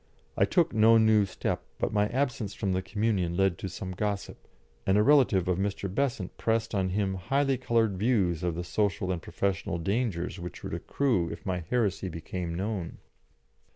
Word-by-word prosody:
I - - +4
took 170 -2 +2
no 110 +1 +6
new 110 -2 +5
step, - - -2 0.2
but - - -1
my 105 0 +3
absence 120 -5 -2
from 100 -3 -1
the 95 - 0
Communion 95 -3 -1
led 95 -3 +2
to 95 - -4
some 95 +1 -6
gossip, 100 +1 -4 0.4
and 95 +1 +3
a 105 - +5
relative 120 -9 +4
of 90 0 +1
Mr. 100 -1 -2
Besant 120 -7 -1
pressed 115 0 0
on 95 -2 +1
him 95 0 0
highly 135 +9 +1
coloured 115 -6 +1
views 100 -8 +2
of 85 -2 -1
the 90 - -3
social 95 0 0
and 90 -2 -2
professional 95 -2 -2
dangers 95 -2 -1
which 85 -2 -8
would - - -5
accrue 115 -12 0
if 85 - -8
my 90 -2 -1
heresy 100 -6 0
became 85 +1 -5
known. 95 -2 -3
100 Hz, 180 wpm, -28 LUFS, 90-110 Hz, 0.4 s, no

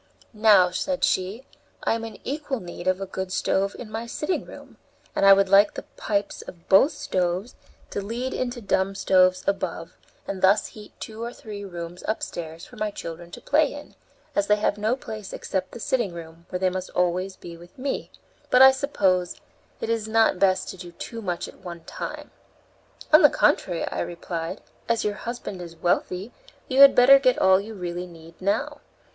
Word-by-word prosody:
"Now," 210 -4 +5
said 270 +9 -2
she, 195 +8 0 0.4
"I - - +2
am 225 0 -3
in 225 -2 -7
equal 285 -2 -3
need 175 -1 -8
of 185 0 +2
a 195 - -3
good 190 0 -5
stove 195 +1 0
in 220 -3 -9
my 225 +2 -4
sitting 300 +9 -2
room, - - -13 0.4
and 195 - +3
I 195 - +10
would 195 0 +3
like 200 +2 +5
the - - -5
pipes 205 -1 -2
of 170 -2 -12
both 200 - +5
stoves 185 +5 -2 0.4
to 200 - -3
lead 235 +6 -4
into 245 -1 -3
dumb 195 -1 0
stoves 185 -1 +3
above, 185 -3 -2 0.3
and 195 -1 -4
thus 195 +3 +4
heat 210 -1 -12
two 220 0 -8
or 235 - -4
three 210 -4 -9
rooms 175 -2 -7
upstairs 170 -6 -4
for - - -15
my 215 - -1
children 170 -3 -8
to - - -10
play 295 0 +2
in, 290 0 -11 0.4
as 200 0 +1
they 210 - +5
have 210 -1 0
no 215 +4 0
place 215 -6 -8
except 185 -1 -3
the - - -9
sitting 240 -8 0
room, 165 0 -11
where 180 - -2
they 185 0 +1
must 185 0 -4
be - - -18
always 180 +2 0
with 170 +1 -12
me; 270 +1 -3 0.4
but 250 +1 +7
I 265 - +10
suppose 195 - 0 0.5
it - - -3
is 225 -2 -1
not 220 -4 +3
best 190 -1 +2
to - - -7
do 175 -1 -10
too 230 +6 -7
much 180 -4 -3
at - - -14
one 170 -2 -9
time." - - -7 0.8
"On 310 - +9
the 295 - +8
contrary," 180 - +1
I - - -4
replied, 170 +1 -4 0.3
"as 230 -1 +1
your 210 - 0
husband 210 -4 -6
is 170 -1 -9
wealthy, 180 +5 -1 0.4
you 265 +1 +3
had 275 -1 +9
better 270 +3 +8
get 255 -2 +3
all 190 0 +5
you 220 +2 -9
really 180 -1 -5
need 165 -1 -14
now. 200 +3 -1
195 Hz, 195 wpm, -25 LUFS, 180-230 Hz, 0.8 s, I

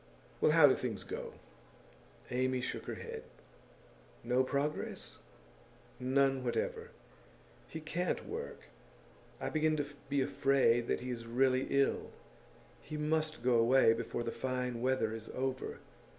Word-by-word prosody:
Well, 155 - +5
how 160 -2 +8
do 135 - +7
things 115 -5 -3
go?' - - -6 1.0
Amy 130 +1 +1
shook 125 - -4
her - - -3
head. - - -6 1.0
'No 125 +2 +3
progress?' 140 +3 -3 0.8
'None 135 +1 +2
whatever. 120 -2 -2 0.8
He 160 - -6
can't 170 +4 -2
work; 455 +3 -5 0.8
I - - -3
begin 155 0 +2
to 145 - 0 0.2
be 140 -1 +2
afraid 130 -3 +3
that - - 0
he 125 0 -4
is 115 -1 -5
really 130 +2 +2
ill. 140 0 +2 0.7
He 155 - -6
must 155 -1 0
go 125 -2 +4
away 115 0 +6
before 115 +1 -3
the 115 - -2
fine 125 -2 -2
weather 130 -3 +1
is 110 0 -7
over. 130 0 -2
130 Hz, 135 wpm, -34 LUFS, 120-145 Hz, 1.0 s, how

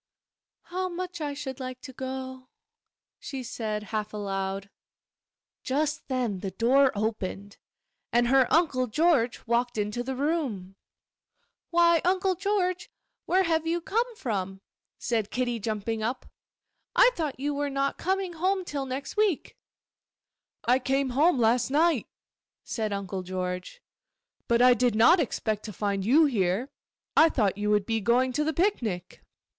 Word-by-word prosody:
'How 370 +1 -3
much 360 -1 -5
I 290 -1 -3
should 275 -2 -6
like 255 -1 -6
to 260 - -10
go!' 260 0 -6 0.7
she 265 -2 -6
said, 215 -3 -4
half 215 0 -2
aloud. 195 -1 -3 0.9
Just 295 +3 -1
then 245 -7 -1
the 195 - -4
door 255 +7 +3
opened, 205 -2 -3 0.5
and 240 0 +3
her 265 -1 +4
Uncle 285 -7 +2
George 270 -2 +2
walked 240 0 0
into 210 +3 -1
the 265 +2 -4
room. 260 - -2 0.9
'Why, 340 -1 +4
Uncle 370 +1 +2
George, 365 -1 -1 0.4
where 375 +2 +3
have 325 -2 0
you 340 +1 +1
come 460 +7 -1
from?' 195 - -3 0.4
said 220 -3 -1
Kitty, 245 -1 -1
jumping 220 +1 -3
up. 240 +4 -2 0.7
'I - - +7
thought 305 - -3
you 290 +2 -1
were 285 0 -1
not 275 0 -1
coming 380 0 -1
home 370 +3 0
till 280 -4 -4
next 260 +2 -5
week.' 420 -7 0 1.1
'I 250 +2 +3
came 270 +1 0
home 300 +5 +3
last 235 +1 +2
night,' 305 -2 +2 0.6
said 220 -2 -3
Uncle 195 -1 -3
George, 185 - -5 0.6
'but 235 +1 +3
I 250 0 +8
did 245 -1 +1
not 285 +12 +6
expect 220 -7 -1
to 215 - -5
find 200 -1 -2
you 285 +10 +5
here. 220 0 0 0.4
I 325 - +7
thought 210 -10 +1
you 210 0 0
would 210 -1 +2
be 225 0 -1
going 250 +4 +2
to 300 - +1
the 315 - 0
picnic. 235 - -1
255 Hz, 145 wpm, -27 LUFS, 215-315 Hz, 1.1 s, I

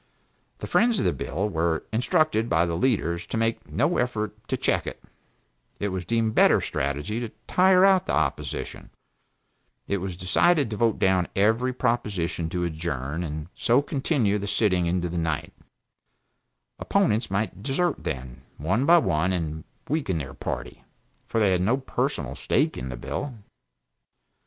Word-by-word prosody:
The - - -6
friends 235 -1 +3
of - - 0
the - - +2
bill 95 +8 -2
were 80 -4 0
instructed 125 -1 +2
by 85 +1 +3
the 85 - -2
leaders 85 -4 0
to - - -3
make 115 0 -1
no 175 - +1
effort 110 -4 -1
to - - -1
check - - 0
it; - - -5 0.8
it 100 - -1
was 95 -1 -4
deemed 115 -1 +1
better - - +5
strategy 75 +11 -2
to 120 -2 -4 0.2
tire 185 0 +5
out 190 -1 +4
the - - +1
opposition; 75 -2 -2 1.0
it 100 - 0
was 95 -2 -5
decided 135 - +2
to - - -2
vote 115 0 +2
down 95 -2 +2
every 110 +6 +2
proposition 105 -10 -1
to 90 +1 -2
adjourn, 80 -2 -3
and 75 -1 -5
so 125 +4 +2
continue 130 -8 0
the 100 - -4
sitting 95 -5 +1
into 90 0 0
the 85 0 -3
night; 80 -1 -2 1.3
opponents 170 - +1
might 100 0 -2
desert, 145 +7 0
then, 65 -1 -5 0.2
one 110 - 0
by 170 +1 +8
one 90 - +1
and 80 -3 -3 0.2
weaken 135 - -1
their 70 -4 -5
party, - - -5 0.4
for 115 - 0
they 105 -3 +4
had 90 -1 +2
no 115 +8 +2
personal 135 - -2
stake - - 0
in 65 +1 -5
the 65 - -5
bill. 130 - -4
100 Hz, 160 wpm, -25 LUFS, 85-120 Hz, 1.3 s, by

